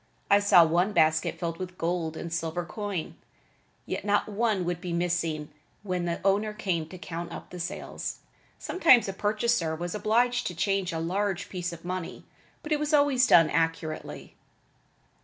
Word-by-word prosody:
I 200 - +7
saw 190 -4 +6
one 175 +6 +1
basket 160 -3 +2
filled 165 -1 -4
with 180 -1 -6
gold 165 -2 -2
and 170 -1 -5
silver 165 +1 -2
coin, 200 -3 -4 0.7
yet - - -4
not 205 0 +1
one 210 -3 0
would 175 0 -2
be 180 -2 -4
missing 170 -3 -1 0.3
when 180 -3 -2
the 170 -1 -2
owner 205 +2 +2
came 180 -7 -2
to 185 - -10
count 170 -1 -6
up - - -9
the 180 - -7
sales. 175 - -5 0.4
Sometimes 290 - +4
a 195 - -3
purchaser 205 -4 0
was 175 +2 -4
obliged 230 +4 +1
to 175 - -5
change 195 +1 0
a 165 - -3
large 190 +3 -1
piece 180 -1 -3
of 170 0 -10
money, 185 -1 -5 0.4
but 305 - -8
it 300 - +2
was 300 +1 +2
always 280 -3 +4
done 165 -2 +6
accurately. 165 0 -2
180 Hz, 170 wpm, -27 LUFS, 165-205 Hz, 0.7 s, I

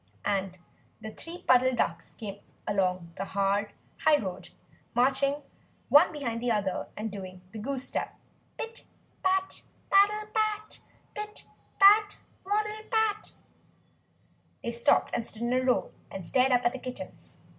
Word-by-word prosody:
and 195 -2 0 0.4
the 220 0 -7
three 335 +10 -8
Puddle 255 0 +5
Ducks - - -2
came 205 -2 -7 0.3
along 185 -4 0
the - - -2
hard 200 +1 0 0.3
high 305 -1 +5
road, 190 -8 -5 0.5
marching 275 +3 +2 0.5
one 300 +5 +7
behind 240 -7 -3
the 245 - 0
other 200 -5 0
and 215 0 -3
doing 185 -2 -8
the 220 - -7
goose 260 +3 -3
step - - -3 0.4
pit 460 +1 -6 0.4
pat 380 0 +1 0.3
paddle 415 +2 +4
pat! 430 -1 -1 0.3
pit 420 0 -7 0.3
pat 415 +1 +7 0.3
waddle 425 +2 -1
pat! 440 -2 0 1.3
They 235 - -2
stopped 235 0 +3
and 230 - -1
stood 225 +1 -7
in 240 +1 +1
a 255 - +3
row, 255 -1 +1 0.2
and 190 -3 -7
stared 260 +7 +3
up 245 -1 +3
at 240 - +3
the 260 - -5
kittens. 255 0 -9
255 Hz, 145 wpm, -29 LUFS, -, 1.3 s, one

